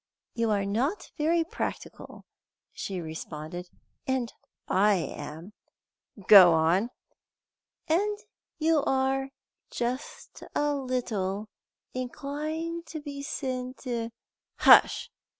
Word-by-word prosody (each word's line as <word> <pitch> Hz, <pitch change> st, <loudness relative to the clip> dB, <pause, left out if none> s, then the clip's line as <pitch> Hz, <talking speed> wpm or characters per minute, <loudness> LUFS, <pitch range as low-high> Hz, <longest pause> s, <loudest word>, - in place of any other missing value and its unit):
"You 230 Hz, -1 st, 0 dB
are 200 Hz, -2 st, +1 dB
not 255 Hz, -, -1 dB
very 330 Hz, +2 st, +2 dB
practical," 325 Hz, -, -6 dB, 0.5 s
she 190 Hz, -2 st, -4 dB
responded, 160 Hz, +1 st, -7 dB, 0.4 s
"and 260 Hz, -3 st, -1 dB, 0.3 s
I 205 Hz, +2 st, +4 dB
am." 165 Hz, +2 st, -6 dB, 0.7 s
"Go 185 Hz, -5 st, +10 dB
on." 170 Hz, +8 st, +3 dB, 1.0 s
"And 410 Hz, +6 st, +1 dB, 0.4 s
you 320 Hz, -1 st, +3 dB
are 270 Hz, 0 st, +1 dB, 0.4 s
just 250 Hz, +4 st, -4 dB
a 295 Hz, 0 st, +2 dB
little 220 Hz, -7 st, -2 dB, 0.4 s
inclined 310 Hz, +6 st, -4 dB
to 315 Hz, -, -6 dB
be 285 Hz, -1 st, -7 dB
senti 255 Hz, -3 st, -4 dB, 0.3 s
" -, -, -64 dB
"Hush! -, -, +6 dB
255 Hz, 95 wpm, -28 LUFS, 195-290 Hz, 1.0 s, Go